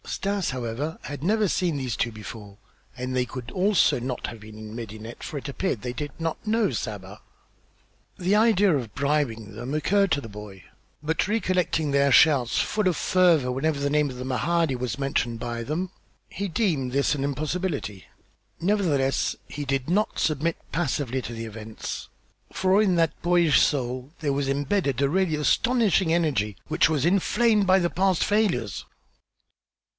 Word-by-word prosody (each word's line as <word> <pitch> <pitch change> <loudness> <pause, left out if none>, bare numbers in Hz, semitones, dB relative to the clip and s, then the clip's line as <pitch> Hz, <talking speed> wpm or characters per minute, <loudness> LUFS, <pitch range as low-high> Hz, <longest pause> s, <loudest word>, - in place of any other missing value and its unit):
Stas, 200 -1 -2
however, 130 +5 -3
had 145 0 -6
never 210 +3 +2
seen 175 -4 0
these 130 -5 -2
two 115 - -1
before, 105 -2 -10 0.4
and 125 0 -3
they 125 -1 +2 0.3
also 185 -5 +3
could 120 - -6
not 125 -1 -3
have 115 - -8
been 110 0 -12
in 110 0 -9
Medinet, 110 0 -8
for 150 - -5
it 140 - -6
appeared 140 - -2
they 125 -1 -3
did 145 +2 -5
not 165 +5 -3
know 220 0 +2
Saba. - - -5 1.0
The 190 +1 +1
idea 210 -2 +4
of 130 -4 -1
attempting 105 - -20
to - - -8
bribe 125 -8 -1
them 120 +5 -5
occurred 195 +6 +2
to 140 - +2
the 115 - -8
boy, 105 -3 -10 0.4
but 160 +4 0
recollecting 185 -7 0
their 140 0 +3
shouts, 135 -4 +5
full 215 -3 0
of 175 -4 +1
fervor, 170 -8 +3
whenever 140 +3 0
the 140 0 0
name 150 -1 +2
of 125 - -8
the 125 - -5
Mahdi 160 +3 +1
was 125 +1 -3
mentioned 125 -4 -1
by 120 0 -4
them, 170 +8 -3 0.4
he 200 - -4
deemed 160 - 0
this 140 +2 +2
an 135 - -3
impossibility. 145 - -3 0.5
Nevertheless, 165 -8 +1
he 145 0 -5
did 135 +1 -1
not 210 +5 +1
submit 155 +2 0
passively 135 -6 -1
to 120 - -7
the 115 0 -5
events, 110 0 -7 0.4
for 190 +2 +3
in 190 -4 +3
that 165 -2 +1
boyish 175 -3 +4
soul 130 -1 0
there 145 -3 0
was 140 0 -1
imbedded 140 - 0
a 140 - +3
really 180 -1 +1
astonishing 190 - +2
energy, 135 - +1
which - - +3
was 150 -3 +1
inflamed 205 +4 +3
by 190 0 +6
the 175 -2 +1
past 190 -1 +1
failures. 205 - 0
145 Hz, 170 wpm, -25 LUFS, 125-180 Hz, 1.0 s, by